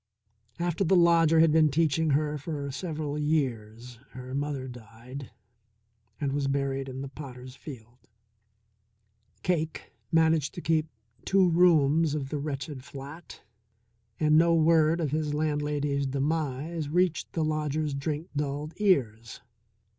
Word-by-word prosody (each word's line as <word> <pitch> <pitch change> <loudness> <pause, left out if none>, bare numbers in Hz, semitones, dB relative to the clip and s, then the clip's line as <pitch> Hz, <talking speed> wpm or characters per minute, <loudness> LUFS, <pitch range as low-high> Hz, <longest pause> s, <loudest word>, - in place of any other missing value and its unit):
After 175 +2 -1
the 190 +1 +3
lodger 165 -2 +5
had 165 -1 +5
been 155 -1 +5
teaching 160 +1 +1
her 150 +1 +1
for 145 -2 -4
several 150 0 -4
years 125 -6 -2
her 130 0 -8
mother 140 -1 -3
died 125 +2 -10 0.9
and 140 -2 -1
was 140 -1 0
buried 135 -1 -1
in 130 +1 -6
the 140 - -5
potters' 130 -2 -10
field. 125 -4 -11 1.4
Cake 160 -3 -2 0.2
managed 160 -3 +2
to 175 - -5
keep 160 -1 +1 0.4
two 190 -1 +4
rooms 160 -3 +4
of 135 -3 -3
the 150 - -3
wretched 145 -1 -5
flat, 140 +5 -10 0.8
and 155 0 +5
no 170 0 +4
word 160 0 +4
of 155 -5 -1
his 150 -1 -1
landlady's 145 -2 -1
demise 145 +2 -2
reached 175 +1 0
the 160 -2 0
lodger's 155 -1 -1
drink 150 +4 -3
dulled 145 +2 -3
ears. 115 - 0
150 Hz, 130 wpm, -28 LUFS, 135-160 Hz, 1.4 s, lodger